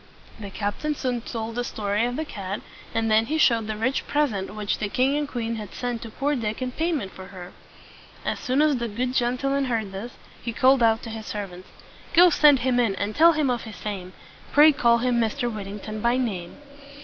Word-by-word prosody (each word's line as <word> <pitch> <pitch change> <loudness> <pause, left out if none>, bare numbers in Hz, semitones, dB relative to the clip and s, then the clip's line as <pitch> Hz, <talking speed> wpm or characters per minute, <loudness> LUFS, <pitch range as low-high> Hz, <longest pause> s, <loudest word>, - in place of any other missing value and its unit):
The 205 -2 -7
captain 205 +10 -2
soon 250 -3 -2
told 225 -1 -5
the 245 +1 -2
story 210 -1 -1
of 245 - -3
the 315 +3 -2
cat; 200 -6 -5 0.3
and 225 0 0
then 220 +1 +4
he 315 - 0
showed 230 -7 +3
the 215 -1 -3
rich 255 +5 -1
present 215 -10 0
which 210 -1 -2
the 205 - -2
king 260 +6 +2
and 295 0 -1
queen 230 -4 -3
had 210 -3 -8
sent 245 -2 -3
to 230 - -7
poor 285 +6 -1
Dick 220 -4 -3
in 255 -1 -3
payment 310 - -1
for 190 0 -10
her. 180 -2 -10 0.7
As - - -1
soon 265 +4 +1
as 300 -3 +3
the 235 -1 -2
good 245 +4 -2
gentleman 265 +3 +1
heard 225 -5 -2
this, 205 +6 -7 0.3
he 235 - -4
called 260 +1 +4
out 225 -1 +3
to 230 - -6
his 220 -1 -7
servants, 185 -3 -6 0.5
"Go 350 +1 +8
send 295 -3 +6
him 250 0 +2
in, 225 -5 +2
and 205 +2 -3
tell 335 +2 +7
him 300 -4 +1
of 240 -1 -1
his 220 -3 -8
fame; 185 -1 -6 0.4
Pray 300 +2 +8
call 235 -4 +3
him 240 0 +1
Mr. 235 +1 -1
Whittington 210 +1 -6
by 235 +2 +2
name." 195 -9 -3
235 Hz, 215 wpm, -25 LUFS, 210-260 Hz, 0.7 s, Go